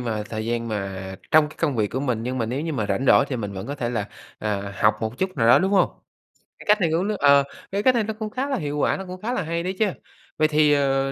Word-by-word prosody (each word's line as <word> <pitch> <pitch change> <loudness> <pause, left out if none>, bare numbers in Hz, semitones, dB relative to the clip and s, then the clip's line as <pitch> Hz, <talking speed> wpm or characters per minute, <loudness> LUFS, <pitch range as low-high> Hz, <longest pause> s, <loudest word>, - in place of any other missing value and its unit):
mà 110 -3 -2
thời 110 -1 -4
gian 115 0 -2
mà 95 -2 -4 0.2
trong 155 -1 +5
cái - - -15
công 145 -6 +1
việc 105 -2 +2
của 130 - -2
mình, 125 -5 -1
nhưng 130 +2 -3
mà 115 - 0
nếu 125 +5 -2
như 160 0 -3
mà 110 -7 -1
rảnh 100 +6 -1
rỗi 140 - +6
thì 130 - -2
mình 105 -3 -4
vẫn 95 +3 -6
có 140 - -4
thể 120 -4 -3
là, 105 -4 -2 0.3
à, 100 -2 -3
học 105 0 +5
một 110 +2 -4
chút 185 -3 -2
nào 115 - +2
đó, - - +8
đúng 190 - +1
hông? 190 - +4 0.7
Cái - - -12
cách 210 -1 +4
này 170 - +3
cũng 180 +4 +1
nó 215 - -1
ờ, 140 -1 +6 0.3
cái 200 +1 -1
cách 255 +1 +5
này 230 - +2
nó 220 - -3
cũng 215 -1 -3
khá 265 +5 -3
là 270 - 0
hiệu 145 -2 -3
quả, - - +1
nó 190 - -6
cũng 185 0 -8
khá 235 +4 -2
là 250 - -1
hay 170 +1 -2
đấy 185 +2 -3
chứ. 220 - +4 0.5
Vậy 155 0 +4
thì, 150 -1 +4
ờ, 135 -1 +1
140 Hz, 300 wpm, -23 LUFS, 110-180 Hz, 0.7 s, đó